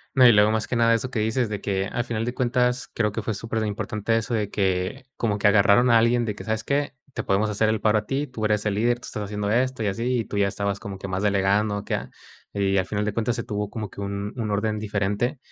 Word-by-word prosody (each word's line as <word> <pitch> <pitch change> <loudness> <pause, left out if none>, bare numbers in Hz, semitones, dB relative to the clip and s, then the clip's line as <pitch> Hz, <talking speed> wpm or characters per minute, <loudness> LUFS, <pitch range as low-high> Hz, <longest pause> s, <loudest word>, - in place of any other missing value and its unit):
No, 130 -1 +7
y - - +9
luego, 105 -1 +5
más 110 0 -1
que - - -2
nada, 115 0 +4
eso 125 +3 -3
que 120 - -2
dices, 110 +2 0
de 100 -2 -4
que, 95 -1 -1
al 120 +4 -2
final 115 -2 -3
de 120 - -2
cuentas, 125 0 +1
creo 105 -2 +1
que 115 - -3
fue 110 - -2
superimportante 110 0 -2
eso 115 +2 -2
de 105 -3 0
que, 95 +6 -1
como 105 -3 0
que 105 - +3
agarraron 105 +4 +5
a 115 - +7
alguien 120 +1 +2
de 105 - -2
que, 95 - -8
¿sabes 110 +1 -2
qué?, 140 +2 -1 0.2
te - - -3
podemos 105 +3 +1
hacer 105 +1 +1
el 110 -1 0
paro 105 0 +3
a 105 - -9
ti, 140 +5 -2
tú 115 -4 -4
eres 105 0 +1
el 105 -2 0
líder, 120 +3 +1
tú - - -11
estás 105 - -4
haciendo 105 0 -3
esto 125 +1 +1
y - - 0
así, 120 +5 0
y 115 - -2
tú 105 - -5
ya 100 -1 +3
estabas 100 0 -2
como 100 -1 -7
que 95 - -7
más 95 0 -2
delegando, 100 +1 +2
o 100 - -6
¿qué?, - - -3
ah. - - -5 0.4
Y 100 -1 +1
al 95 - -1
final 105 0 -1
de 105 - -1
cuentas, 115 +2 0
se 115 - -3
tuvo 105 -1 -3
como 105 -3 -6
que - - -8
un 100 +1 -4
un 115 -4 -3
orden 105 +1 0
diferente. 105 +5 -1
105 Hz, 280 wpm, -24 LUFS, 100-115 Hz, 0.4 s, y